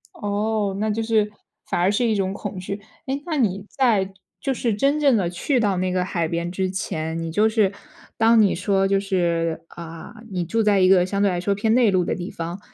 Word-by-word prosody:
哦， 205 -1 -1
那 215 0 0
就 225 +2 -1
是 215 -2 +1 0.4
反 - - -1
而 185 +3 +3
是 240 +4 +1
一 220 - +1
种 195 -1 -1
恐 200 -2 -6
惧， 200 +2 -5 0.2
哎， 275 +1 -2
那 320 -3 -2
你 200 -5 0
在 210 -8 +1 0.3
就 270 -1 0
是 235 -3 -1
真 280 +8 +1
正 280 -5 +4
地 180 -5 +1
去 245 - 0
到 200 -4 +1
那 185 0 0
个 180 0 +1
海 170 -3 -1
边 170 +1 -2
之 185 0 -1
前， 160 -3 -3
你 165 0 -4
就 210 +5 +3
是 215 -3 +2 0.5
当 225 0 +5
你 200 - +4
说 195 +1 +1
就 195 0 +2
是 170 -4 0
啊， 165 +2 -9 0.2
你 180 -2 -1
住 225 +7 0
在 205 -2 +3
一 185 0 +5
个 180 -2 +5
相 200 +1 -2
对 200 - +4
来 175 - -1
说 200 +2 0
偏 220 +2 +1
内 235 -4 +4
陆 185 -2 +2
的 - - -1
地 180 +1 -5
方， 170 +3 -5
195 Hz, 245 characters per minute, -23 LUFS, 180-220 Hz, 0.5 s, 当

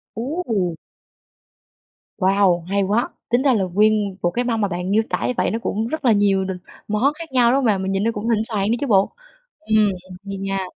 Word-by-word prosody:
Ú, 280 +10 -3
ù. 180 -7 -1 1.4
Wow, 190 -3 +2
hay 200 0 +1
quá! 210 +5 +1 0.2
Tính 240 +2 +2
ra 270 -3 +4
là 200 -4 +1
nguyên 205 +1 +2
một 175 - +1
cái 245 - -1
mâm 230 -2 0
mà 205 - +2
bạn 180 +1 -3
miêu 220 +2 +3
tả - - -1
như - - 0
vậy - - +1
nó 225 - -2
cũng 220 0 -2
rất 315 0 -4
là 235 - +6
nhiều 200 -2 +3
n - - -5 0.4
món 230 +8 +1
khác 325 -2 -10
nhau, 245 -2 +4
đúng - - +3
hông 275 -2 +1
bạn? 200 -4 +2
Mình 190 - -2
nhìn 195 +1 0
nó 230 - +1
cũng 210 +3 -3
thịnh 220 -1 +2
soạn 215 -2 0
nữa - - +3
chứ 285 - -2
bộ. 195 -3 +3 0.5
Ừm, 215 -8 +2 0.4
hay 195 - -5
nha. 195 0 -2
210 Hz, 235 wpm, -21 LUFS, 195-235 Hz, 1.4 s, là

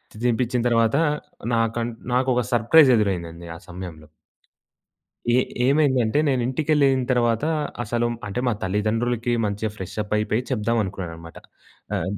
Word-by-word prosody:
తిని 105 - -10
తినిపించిన 125 0 +1
తర్వాత, 115 +2 +3 0.6
నాకన్ 115 +1 0 0.2
నాకొక 125 -1 +2
సర్‌ప్రైజ్ 130 +5 +6
ఎదురైందండి. 85 -5 -2
ఆ - - -8
సమయంలో. 90 -4 -8 1.2
ఏ 120 - +4 0.3
ఏమైందంటే, 135 -3 +3
నేను 130 -3 +1
ఇంటికెళ్ళిన 140 -1 +2
తర్వాత, 120 -1 +1 0.4
అసలు 120 +1 -1 0.2
అంటే 100 +4 -3
మా 120 - +2
తల్లిదండ్రులకి 115 +5 0
మంచిగా 105 +1 -2
ఫ్రెష్‌అప్ 105 +3 -4
అయిపేయి 105 +3 0
చెప్దాం 115 -1 0
అనుకున్నానన్నమాట. 85 -4 -7 0.6
ఆగ్ 95 +4 -3
115 Hz, 120 wpm, -23 LUFS, 100-125 Hz, 1.2 s, సర్‌ప్రైజ్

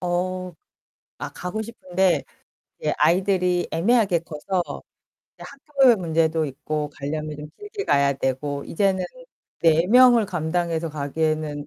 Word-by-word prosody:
어 180 +1 -2 0.7
아 - - -2
가고 180 +5 -5
싶은데 190 -4 0 0.6
이제 - - 0
아이들이 180 0 +2
애매하게 195 0 +2
커서 170 +3 -3 0.8
이제 - - -11
학교의 275 -4 +3
문제도 160 -2 +1
있고 150 +2 -4
가려면 150 +1 -4
좀 150 +1 -8
길게 415 0 -6
가야 140 0 +3
되고 140 +2 -2
이제는 190 +1 0 0.6
4 165 +1 +4
명을 245 +1 +6
감당해서 170 -1 -1
가기에는 150 0 -2
170 Hz, 270 characters per minute, -23 LUFS, 155-190 Hz, 0.8 s, 명을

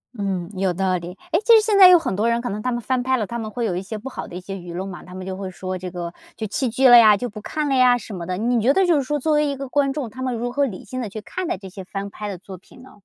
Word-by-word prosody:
嗯， 190 -4 -2
有 190 -1 0
道 185 0 0
理， 175 +2 -8
诶， 335 - +3
其 460 0 +7
实 440 - +7
现 430 -1 +1
在 375 - +11
有 360 -1 +8
很 320 - -2
多 220 +4 +1
人 235 0 +1
可 245 - -4
能 210 +1 -4
他 250 - -1
们 240 - -1
翻 255 +1 -1
拍 260 +1 +1
了， 215 - -1
他 235 +3 -5
们 215 -1 -4
会 235 +1 -3
有 180 -5 -1
一 180 - -2
些 215 +3 -6
不 260 +6 -7
好 - - -7
的 175 - -10
一 - - -4
些 195 +2 -7
舆 175 -2 -8
论 185 +3 -4
嘛， 180 -2 -8
他 180 0 -12
们 185 0 -7
就 190 -1 -4
会 190 -1 -5
说 185 +2 -5
这 180 0 -5
个 175 -1 -6 0.2
就 220 - -3
弃 240 +4 -1
剧 260 +3 +3
了 245 - +9
呀， 215 -3 +8
就 245 - -3
不 210 0 -9
看 305 +5 -3
了 275 - 0
呀 250 -1 +5
什 220 -2 -9
么 175 -2 -6
的。 180 0 -2
你 235 +1 +1
觉 255 +5 +4
得 385 -1 +4
就 345 -3 +3
是 285 - +2
说 295 +3 -2
作 310 +3 +1
为 300 0 +3
一 280 - -2
个 275 0 -6
观 275 0 +1
众， 275 -4 -3
他 260 - -9
们 255 -2 -1
如 240 +1 -3
何 280 +2 +1
理 200 -8 -7
性 255 0 -5
地 220 - -4
去 215 - -7
看 365 +10 -5
待 - - -2
这 195 - -10
些 190 0 -9
翻 195 +1 -6
拍 210 -1 -6
的 190 - -5
作 190 -1 -11
品 250 +6 -18
呢？ 260 - -17
220 Hz, 385 characters per minute, -22 LUFS, 190-260 Hz, 0.2 s, 在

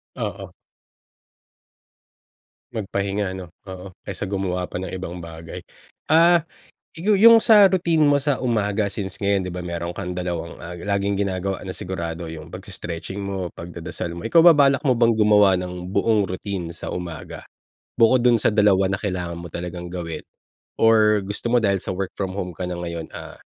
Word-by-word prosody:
Oo. - - -5 2.2
Magpahinga, 100 -2 -2
ano. 90 -2 -10 0.2
Oo, 95 0 -9
kaysa - - -5
gumawa 95 -2 -2
pa 90 - -6
ng 95 - -5
ibang 90 -1 -6
bagay. 80 0 -9 0.5
Ah, 170 +2 +6 0.5
'yo 200 +6 +2
'yong 230 +2 +9
sa 210 -3 +8
routine 170 -4 +2
mo 145 - +4
sa 145 -3 0
umaga, 105 -4 0
since 95 -2 -5
ngayon, 100 -1 +1
'di 90 - -5
ba, 90 - -5
meron 85 0 -4
kang 90 0 -5
dalawang, 85 -2 -4
ah, 85 +1 -7
laging 100 +1 -1
ginagawa 95 -1 -2
na 95 - -5
sigurado, 85 -3 -5
'yong 80 -1 -9
pagse-stretching 85 +3 -7
mo, 100 -2 -3
pagdadasal 85 0 -7
mo. 85 - -7
Ikaw 165 +9 +5
ba, 175 - +9
balak 140 0 +4
mo 125 - +4
bang 115 -1 +3
gumawa 105 -3 +5
ng 90 0 -6
buong 105 +1 +2
routine 95 -2 -4
sa - - -8
umaga? 85 -2 -6 0.5
Bukod 120 +1 +5
do'n 120 -2 +5
sa - - +4
dalawa 100 -3 +4
na 95 - 0
kailangan 90 -4 -3
mo 85 - -8
talagang 90 0 -5
gawin. 85 -2 -5 0.6
Or 110 -2 +4
gusto 105 +4 -3
mo 120 - +4
dahil 100 -2 +2
sa - - -4
work 95 0 -3
from 95 -2 -3
home 90 -2 -3
ka 90 +2 -4
na 90 - -4
ngayon, 85 -2 -5
ah, - - -9
95 Hz, 170 wpm, -22 LUFS, 90-110 Hz, 2.2 s, yong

